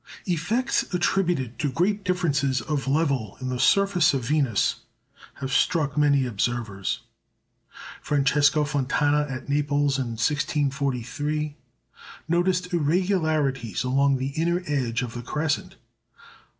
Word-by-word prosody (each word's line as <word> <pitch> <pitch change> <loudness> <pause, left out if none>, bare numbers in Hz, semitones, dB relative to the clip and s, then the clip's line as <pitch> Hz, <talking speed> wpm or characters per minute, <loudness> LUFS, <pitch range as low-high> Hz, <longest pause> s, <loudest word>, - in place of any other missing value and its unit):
Effects 210 - 0
attributed 175 -10 0
to 145 - 0
great 195 +8 0
differences 145 -8 +1
of 140 +2 -3
level 135 -8 0
in 130 -1 -4
the 125 -1 -3
surface 185 +1 +4
of 130 - -2
Venus 135 -7 +1 0.6
have 135 -1 -5
struck 145 -1 +1
many 145 -3 +3
observers. 115 -3 -2 1.0
Francesco 145 +1 +2
Fontana 145 +1 +1
at 130 0 -6
Naples 145 -1 +1
in 120 -3 -2
1643 145 +2 -1 0.7
noticed 180 +2 0
irregularities 155 - 0
along 135 +2 +2
the 130 +1 -2
inner 170 +5 -1
edge 125 -6 -1
of 120 -2 -5
the 120 - -5
crescent. 150 +4 -2
145 Hz, 110 wpm, -25 LUFS, 130-160 Hz, 1.0 s, surface